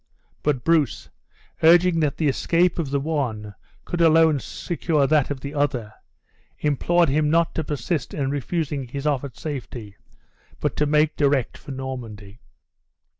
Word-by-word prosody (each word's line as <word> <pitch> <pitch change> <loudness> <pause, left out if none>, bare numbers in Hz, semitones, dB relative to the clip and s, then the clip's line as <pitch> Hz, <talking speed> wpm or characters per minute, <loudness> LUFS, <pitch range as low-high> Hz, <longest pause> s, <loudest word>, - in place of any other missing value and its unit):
But 145 -4 0
Bruce, 160 -6 +1 0.5
urging 170 +1 +5
that 150 -3 0
the 155 - +1
escape 170 +6 +1
of 155 -5 -2
the 140 0 0
one 125 -9 -3 0.3
could 175 - -2
alone 160 -2 +5
secure 160 -1 -1
that 150 -1 +2
of 140 -2 -4
the 140 +1 -6
other, 130 -7 -1 0.6
implored 170 +4 +2
him 150 +2 +2
not 165 +1 +2
to 160 - -2
persist 150 0 -3
in 140 -2 -2
refusing 145 -1 -2
his 140 +4 -6
offered 140 -4 -1
safety, 120 -8 -7 0.6
but - - -1
to 150 - +2
make 150 +1 +2
direct 140 -4 +1
for - - -14
Normandy. 120 -6 -7
145 Hz, 145 wpm, -23 LUFS, 130-160 Hz, 0.6 s, urging